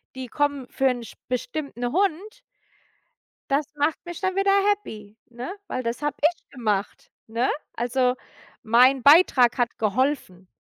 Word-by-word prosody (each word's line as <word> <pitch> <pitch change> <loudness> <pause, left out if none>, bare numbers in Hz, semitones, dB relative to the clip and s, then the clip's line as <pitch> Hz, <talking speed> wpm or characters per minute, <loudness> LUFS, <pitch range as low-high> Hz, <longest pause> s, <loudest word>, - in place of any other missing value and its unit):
die 260 -1 -6
kommen 285 -1 -1
für 270 - +1
'n 245 -2 0
sp 220 - -13
bestimmten 250 -1 -3
Hund 395 +6 -1 1.1
Das 285 +2 +2
macht 295 +2 +1
mich 345 -1 -8
dann 375 0 -1
wieder 390 0 +2 0.2
happy, 215 - -5
ne? 245 +6 -7 0.2
Weil 255 - -3
das 235 +4 -4
habe 295 -1 -1
ich 325 +3 0
gemacht, 210 -5 -3 0.2
ne? 230 +3 -1 0.3
Also, 250 +1 +1 0.5
mein 250 +3 +4
Beitrag 280 -5 +6
hat 245 -1 -1
geholfen, 215 -5 -1
260 Hz, 140 wpm, -24 LUFS, 235-300 Hz, 1.1 s, Beitrag